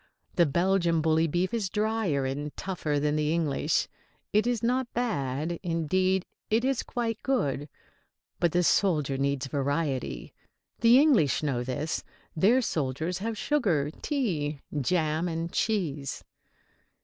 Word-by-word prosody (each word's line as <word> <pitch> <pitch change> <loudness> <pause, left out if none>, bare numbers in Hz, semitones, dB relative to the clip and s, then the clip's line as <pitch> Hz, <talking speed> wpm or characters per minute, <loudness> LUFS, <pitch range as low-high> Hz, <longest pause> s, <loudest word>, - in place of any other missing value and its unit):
The 170 -2 +4
Belgian 170 +2 +2
bully 160 +1 +3
beef 175 +6 -1
is 215 -5 -1
drier 210 -9 0
and 145 +3 -4
tougher 160 -6 -2
than 150 +1 +1
the 150 0 +1
English. 160 -4 +1 0.5
It 215 +3 +3
is 240 -3 0
not 250 +1 0
bad; 160 - -1
indeed, 185 +2 +1 0.2
it 225 +3 +2
is 270 -2 +1
quite 230 -2 -3
good. 145 - -1 0.7
But 175 - +2
the 180 +2 +2
soldier 155 -7 +2
needs 140 0 0
variety. 140 -1 -2 0.5
The 235 +1 +6
English 235 - +4
know 130 -5 0
this. 140 +5 -3 0.3
Their 225 +10 +4
soldiers 160 - -2
have 220 +2 -3
sugar, 180 - +1
tea, 160 - -1 0.2
jam 160 +2 +1
and 165 0 -3
cheese. 155 - -1
165 Hz, 130 wpm, -28 LUFS, 145-215 Hz, 0.7 s, The